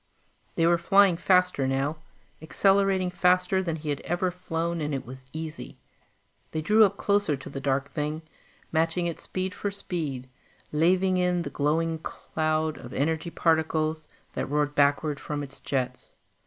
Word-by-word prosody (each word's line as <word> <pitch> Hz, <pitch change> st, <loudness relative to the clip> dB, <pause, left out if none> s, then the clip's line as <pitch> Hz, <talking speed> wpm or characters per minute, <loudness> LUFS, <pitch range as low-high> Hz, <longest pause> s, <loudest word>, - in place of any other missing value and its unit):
They 165 Hz, -, +2 dB
were 170 Hz, 0 st, +4 dB
flying 195 Hz, +1 st, +5 dB
faster 180 Hz, -5 st, +2 dB
now, 135 Hz, +4 st, 0 dB, 0.4 s
accelerating 195 Hz, +2 st, +2 dB
faster 180 Hz, +1 st, +3 dB
than 170 Hz, -4 st, -2 dB
he 155 Hz, -1 st, -6 dB
had 145 Hz, -2 st, -1 dB
ever 175 Hz, +2 st, -1 dB
flown, 170 Hz, -2 st, -3 dB
and 150 Hz, -1 st, -1 dB
it 130 Hz, -, -5 dB
was 130 Hz, +1 st, -10 dB
easy. 160 Hz, 0 st, -7 dB, 0.7 s
They 155 Hz, -, -3 dB
drew 215 Hz, +7 st, +5 dB
up 200 Hz, 0 st, -1 dB
closer 200 Hz, -8 st, +1 dB
to 130 Hz, -, -10 dB
the 135 Hz, -, -5 dB
dark 135 Hz, 0 st, -1 dB
thing, 150 Hz, +1 st, -3 dB, 0.5 s
matching 165 Hz, +2 st, +1 dB
it 170 Hz, -2 st, -3 dB
speed 185 Hz, 0 st, -3 dB
for 205 Hz, -, -3 dB
speed, 160 Hz, -10 st, -4 dB, 0.4 s
laving 185 Hz, +4 st, +3 dB
in 180 Hz, -1 st, +1 dB
the -, -, -6 dB
glowing 160 Hz, +3 st, 0 dB
cloud 155 Hz, 0 st, -2 dB
of 120 Hz, -, -10 dB
energy 160 Hz, +4 st, 0 dB
particles 160 Hz, -1 st, +1 dB, 0.3 s
that -, -, -2 dB
roared 145 Hz, 0 st, +1 dB
backward 145 Hz, +1 st, +2 dB
from 145 Hz, -1 st, -4 dB
its 140 Hz, -1 st, -11 dB
jets. 130 Hz, -2 st, -3 dB
160 Hz, 155 wpm, -27 LUFS, 145-180 Hz, 0.7 s, flying